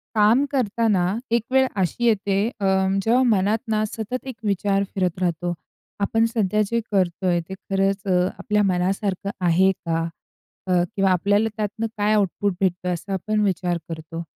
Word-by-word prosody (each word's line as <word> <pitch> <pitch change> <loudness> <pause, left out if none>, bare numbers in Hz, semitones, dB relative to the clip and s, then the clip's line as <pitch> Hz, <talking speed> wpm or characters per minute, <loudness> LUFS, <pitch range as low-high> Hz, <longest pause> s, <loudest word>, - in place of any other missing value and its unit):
काम 220 +6 +5
करताना 225 -6 +1 0.3
एक 235 -1 +2
वेळ 265 0 +4
अशी 190 +7 -1
येते 200 -3 +2 0.2
अ, 200 - -1 0.4
जेव्हा 235 +4 +3
मनात 210 -2 +2
ना 215 0 +2
सतत 225 +4 -5
एक 260 - -5
विचार 200 -1 +1
फिरत 180 -2 -1
राहतो. 175 -1 -1 0.5
आपण 225 +3 +2
सध्या 215 -3 +1
जे 235 +3 0
करतोय, 180 -2 +1
ते - - -5
खरंच 195 0 -1
अ, 180 -2 +2
आपल्या 210 -1 +1
मनासारखं 190 +1 -1 0.2
आहे 185 +3 +4
का? 165 -3 -2 0.7
अ, - - -1 0.2
किंवा 195 -1 +3
आपल्याला 205 +4 +2
त्यातनं 215 +2 -2
काय 210 +1 +2
आउटपुट 205 -1 +1
भेटतो 180 -1 0
असा 175 +3 -5
आपण 210 +3 -1
विचार 180 -3 0
करतो. 165 0 -6
200 Hz, 155 wpm, -23 LUFS, 185-215 Hz, 0.7 s, काम